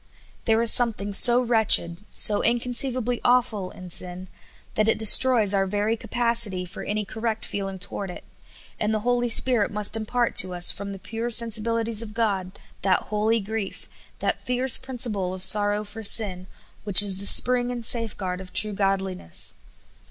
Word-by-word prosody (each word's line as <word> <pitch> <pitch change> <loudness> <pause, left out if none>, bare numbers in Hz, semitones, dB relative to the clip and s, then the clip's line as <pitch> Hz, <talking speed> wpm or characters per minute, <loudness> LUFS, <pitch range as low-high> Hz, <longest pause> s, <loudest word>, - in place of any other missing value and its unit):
There 225 0 0
is 230 - +6
something 215 -4 +1
so 240 +4 +7
wretched, 210 -6 +2
so 205 -1 +1
inconceivably 245 +1 -1
awful, 240 -6 -1
in 185 -1 -12
sin, 180 +1 -1 0.4
that 215 0 -1
it 225 - +1
de 220 - -2
stroys 225 -3 +5
our 195 -1 -1
very 210 +3 -3
capacity 230 -6 0
for 175 - -10
any 210 0 -5
correct 220 +1 -6
feeling 195 -1 -7
toward 200 +1 -7
it; 180 - -11 0.6
and 215 +1 -2
the 215 - -4
Holy 245 +1 -2
Spirit 230 -2 +2
must 210 +1 +1
impart 235 +2 -3
to 185 -1 +4
us, 175 0 +4
from 200 +1 -8
the 195 - -9
pure 225 +5 -7
sensibilities 230 -1 +1
of 215 -2 -11
God, 195 -5 -4 0.2
that 185 -1 -2
holy 220 +2 -1
grief, 215 -1 -8 0.3
that - - -4
fierce 250 +1 +1
principle 225 -8 -2
of 185 - -6
sorrow 205 +2 +2
for 210 +2 -11
sin, 195 -4 +1 0.4
which 205 -1 +5
is 195 -2 -2
the 200 - -2
spring 245 0 +4
and 240 -2 -7
safeguard 205 -6 0
of 185 -1 -14
true 215 -1 +1
godliness. 195 - -4
215 Hz, 165 wpm, -22 LUFS, 195-235 Hz, 0.6 s, so